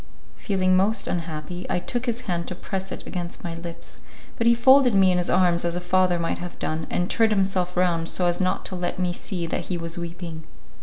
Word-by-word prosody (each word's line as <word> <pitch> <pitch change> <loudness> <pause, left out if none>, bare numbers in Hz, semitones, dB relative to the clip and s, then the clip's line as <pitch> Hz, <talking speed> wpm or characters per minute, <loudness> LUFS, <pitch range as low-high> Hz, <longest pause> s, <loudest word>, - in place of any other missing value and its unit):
Feeling 185 -3 +1
most 200 +5 +2
unhappy, 170 +1 -4
I - - +1
took 245 +7 -2
his 235 +1 -1
hand 175 -7 -2
to 180 - -4
press 190 +1 -5
it - - -6
against 175 -2 -5
my 170 - -4
lips, 165 0 -9 0.3
but 230 - +1
he 235 - +6
folded 260 -1 +6
me 190 -1 +5
in 180 - +2
his 175 - -1
arms 175 -2 +3
as 170 0 -1
a - - -1
father 180 0 +2
might 170 -1 -2
have 175 0 -7
done, 155 0 -3
and 175 - 0
turned 225 +2 +2
himself 190 -3 0
round 170 -2 +2
so 180 - +1
as 175 +1 +1
not 185 0 0
to 185 - -2
let 180 -1 -2
me 180 -1 0
see 180 -1 -4
that 165 - -3
he 180 - -2
was 165 0 -4
weeping. 170 -1 -6
180 Hz, 225 wpm, -24 LUFS, 170-190 Hz, 0.3 s, he